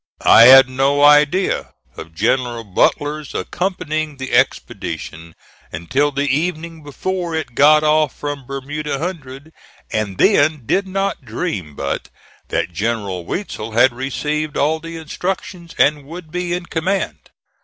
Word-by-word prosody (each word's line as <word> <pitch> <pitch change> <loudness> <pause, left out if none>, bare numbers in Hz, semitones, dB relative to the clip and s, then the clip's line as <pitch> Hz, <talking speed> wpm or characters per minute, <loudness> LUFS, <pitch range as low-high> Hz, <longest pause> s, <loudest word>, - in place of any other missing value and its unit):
I 115 - +8
had 135 +1 +9
no 135 +2 +1
idea 150 +5 +3 0.2
of 80 0 -10
General 120 +4 0
Butler's 145 - -1
accompanying 155 -5 -3
the 130 -2 -6
expedition 85 -9 -2 0.4
until 130 - 0
the 140 +1 -1
evening 160 +2 -2
before 170 +4 -4
it 155 -6 -4
got 150 +4 +5
off 155 -2 +2
from 145 -3 -6
Bermuda 140 +2 -4
Hundred, 150 -2 -7 0.4
and 105 -3 -2
then 155 - +3
did 195 - 0
not 195 +1 -2
dream 90 - -4
but 70 0 -4 0.4
that 85 - -2
General 100 -3 -2
Weitzel 115 - -5
had 120 +2 +4
received 150 +4 -3
all 155 +3 +1
the 165 +1 -8
instructions, 170 +1 -5
and 145 0 +3
would 165 +1 -10
be 180 0 -2
in 175 0 -3
command. 185 +4 -3
145 Hz, 135 wpm, -18 LUFS, 125-160 Hz, 0.4 s, had